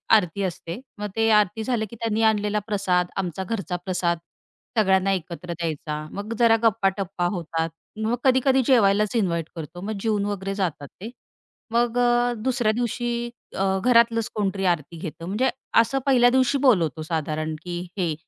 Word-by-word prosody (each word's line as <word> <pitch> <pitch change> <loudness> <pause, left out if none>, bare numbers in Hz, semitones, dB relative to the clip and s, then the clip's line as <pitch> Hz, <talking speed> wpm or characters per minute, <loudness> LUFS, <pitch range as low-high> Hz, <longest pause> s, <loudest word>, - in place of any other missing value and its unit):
आरती 200 -1 +1
असते. 175 +1 -4 0.2
मग 210 0 -3
ते 225 0 +2
आरती 210 +1 +3
झालं, 230 -2 0
की 235 - -10
त्यांनी 225 -1 -1
आणलेला 210 -1 +2
प्रसाद 185 -4 +1
आमचा 190 -1 -2
घरचा 195 -2 -3
प्रसाद 175 -2 0 0.6
सगळ्यांना 190 -2 +3
एकत्र 175 -1 -5
द्यायचा. 155 -2 -4
मग 205 +3 -5
जरा 230 -1 +5
गप्पा-टप्पा 195 -3 +1
होतात 165 -1 -2 0.4
मग 230 +2 +1
कधी-कधी 265 0 +4
जेवायलाच 210 -4 +3
इन्व्हाइट 170 -7 0
करतो. 165 +2 -7
मग 215 +1 -4
जेवून 210 -2 0
वगैरे 195 -1 -3
जातात 160 -7 -2
ते. 220 - -5 0.6
मग 235 +1 +1
अ, 240 0 +3
दुसऱ्या 245 -4 +1
दिवशी 240 +1 -2 0.3
अ, 195 - +1 0.2
घरातलंच 230 -2 +4
कोणतरी 195 -2 -1
आरती 170 -2 0
घेतं 165 0 -7
म्हणजे 215 +9 +1 0.3
असं 270 +4 -1
पहिल्या 250 -3 +5
दिवशी 260 +2 +3
बोलवतो 180 - +3
साधारण, 155 -1 -2
की 175 -1 -4 0.2
हे. 175 -4 0
200 Hz, 155 wpm, -24 LUFS, 175-230 Hz, 0.6 s, जरा